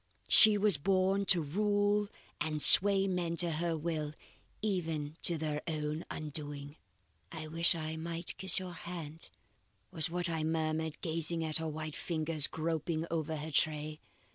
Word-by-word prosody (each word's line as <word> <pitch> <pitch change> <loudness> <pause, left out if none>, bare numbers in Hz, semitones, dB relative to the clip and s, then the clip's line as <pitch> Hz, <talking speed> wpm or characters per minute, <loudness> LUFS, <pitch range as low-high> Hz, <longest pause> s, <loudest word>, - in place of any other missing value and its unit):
She 215 -2 +7
was 200 -7 +2
born 195 +3 0
to 175 -4 +3
rule 205 +5 0 0.3
and 155 0 -3
sway 195 +4 +9
men 175 -3 -3
to 170 0 0
her 165 +1 -2
will 155 -2 -4 0.5
even 160 -7 -3
to 170 - +4
their 150 -1 -4
own 155 0 -4
undoing." 145 -1 -8 0.6
"'I 160 -1 -8
wish 170 +2 0
I 160 -1 -6
might 165 +1 -4
kiss 190 -2 -2
your 185 -2 -6
hand,' 165 -2 -9 0.6
was 165 -2 -3
what 175 0 -1
I 165 -2 -3
murmured, 160 0 -3
gazing 165 0 -2
at 155 -1 0
her 160 0 -5
white 155 0 -6
fingers 155 -2 -2
groping 160 0 -3
over 160 -1 -3
her 155 +1 -7
tray. 150 +1 +1
160 Hz, 150 wpm, -31 LUFS, 155-175 Hz, 0.6 s, sway